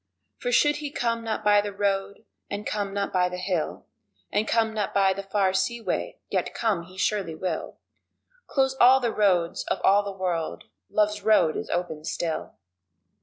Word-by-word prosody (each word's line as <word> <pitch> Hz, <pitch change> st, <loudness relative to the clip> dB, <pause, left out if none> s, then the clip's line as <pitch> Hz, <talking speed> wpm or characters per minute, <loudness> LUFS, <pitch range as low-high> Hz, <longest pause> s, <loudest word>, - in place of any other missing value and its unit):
For 245 Hz, -, -2 dB
should 295 Hz, +4 st, +4 dB
he 295 Hz, -1 st, -4 dB
come 230 Hz, -4 st, -1 dB
not 220 Hz, -1 st, -3 dB
by 205 Hz, -1 st, +5 dB
the 205 Hz, 0 st, -4 dB
road, 200 Hz, 0 st, -2 dB, 0.2 s
and 205 Hz, +1 st, -4 dB
come 205 Hz, -2 st, -2 dB
not 200 Hz, 0 st, -2 dB
by 180 Hz, -1 st, +3 dB
the 180 Hz, -, -5 dB
hill 180 Hz, -3 st, -2 dB, 0.5 s
And 210 Hz, +2 st, +1 dB
come 225 Hz, -1 st, +2 dB
not 210 Hz, -2 st, -2 dB
by 195 Hz, -1 st, +4 dB
the 195 Hz, -, -5 dB
far 195 Hz, -1 st, +1 dB
seaway, 235 Hz, +4 st, -1 dB
yet -, -, -1 dB
come 205 Hz, -7 st, 0 dB
he 185 Hz, +1 st, -15 dB
surely 190 Hz, -5 st, 0 dB
will 170 Hz, 0 st, -4 dB, 0.7 s
Close 265 Hz, -1 st, +1 dB
all 255 Hz, +2 st, +8 dB
the 240 Hz, -3 st, -1 dB
roads 180 Hz, -5 st, +2 dB
of -, -, -1 dB
all 200 Hz, +1 st, +5 dB
the 200 Hz, -1 st, -5 dB
world, 180 Hz, -4 st, -3 dB, 0.3 s
love's 210 Hz, 0 st, +1 dB
road 210 Hz, -8 st, +4 dB
is -, -, -4 dB
open 170 Hz, -3 st, -2 dB
still! 160 Hz, 0 st, -3 dB
200 Hz, 175 wpm, -26 LUFS, 185-220 Hz, 0.7 s, all